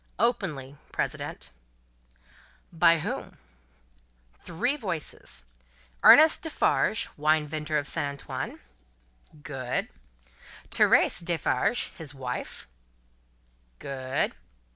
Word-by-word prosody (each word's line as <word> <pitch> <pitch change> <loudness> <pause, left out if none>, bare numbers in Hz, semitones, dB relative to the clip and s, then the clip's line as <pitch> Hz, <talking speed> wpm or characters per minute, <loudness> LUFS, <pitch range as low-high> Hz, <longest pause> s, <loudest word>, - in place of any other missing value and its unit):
"Openly, 155 - -1
President." - - -4 1.2
"By 165 0 +5
whom?" - - -5 1.0
"Three 245 - 0
voices. 165 - -5 0.6
Ernest 310 +1 +8
Defarge, 295 -7 +1
wine 155 +1 +2
vendor 150 0 -2
of 145 - -1
St. 145 - -1
Antoine." 140 0 -6 0.8
"Good." 130 -3 -3 0.8
"Thérèse 175 - +4
Defarge, 170 - 0
his 145 -3 -7
wife." 125 -2 -5 1.1
"Good." 130 - -2
150 Hz, 75 wpm, -27 LUFS, 135-175 Hz, 1.2 s, Ernest